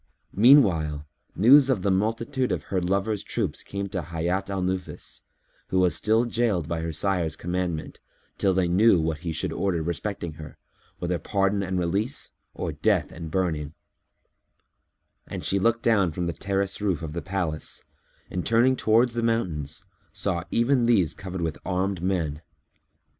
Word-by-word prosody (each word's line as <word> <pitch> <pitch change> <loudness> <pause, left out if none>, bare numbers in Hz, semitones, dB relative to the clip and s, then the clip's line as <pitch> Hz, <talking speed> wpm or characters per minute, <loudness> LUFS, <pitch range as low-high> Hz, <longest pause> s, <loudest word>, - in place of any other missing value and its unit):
Meanwhile, 90 - +5 0.3
news 135 +6 +7
of 115 -9 +1
the 100 - +2
multitude 115 +6 0
of - - -1
her 95 - +2
lover's 100 +3 0
troops - - -3
came 100 0 -4
to 95 -2 -2
Hayat 85 +4 -2
al 95 -2 -2
Nufus, 90 0 -4 0.5
who 95 - -1
was 90 -3 +3
still 110 +6 +2
jailed 115 -9 0
by 80 0 -2
her 80 0 -3
sire's 85 0 0
commandment, 90 -2 -3 0.4
till 100 - +3
they 90 -1 +2
knew 95 +2 +5
what 80 -1 -1
he 85 0 -4
should 80 - -2
order 90 -5 0
respecting 85 0 -3
her, 75 - -10 0.4
whether 85 0 -2
pardon 100 +3 0
and 95 -1 -2
release 100 +9 -1 0.2
or - - -3
death - - +1
and 80 -1 -7
burning; 80 -4 -1 1.5
and - - -6
she 100 - +1
looked 115 +3 +1
down 100 -7 +3
from 90 +3 -3
the 85 - -2
terrace 100 +3 -1
roof 95 -6 0
of 75 -2 -5
the 85 - -3
palace 90 -5 -3 0.5
and, 90 - -2
turning 120 +3 +3
towards 115 +1 +3
the 120 - -1
mountains, 85 -9 -1 0.3
saw 95 -4 -1
even 120 +1 +2
these 95 -9 +3
covered 95 -2 -6
with 80 -2 -2
armed 95 0 -1
men. 85 -5 -1
95 Hz, 160 wpm, -26 LUFS, 85-105 Hz, 1.5 s, news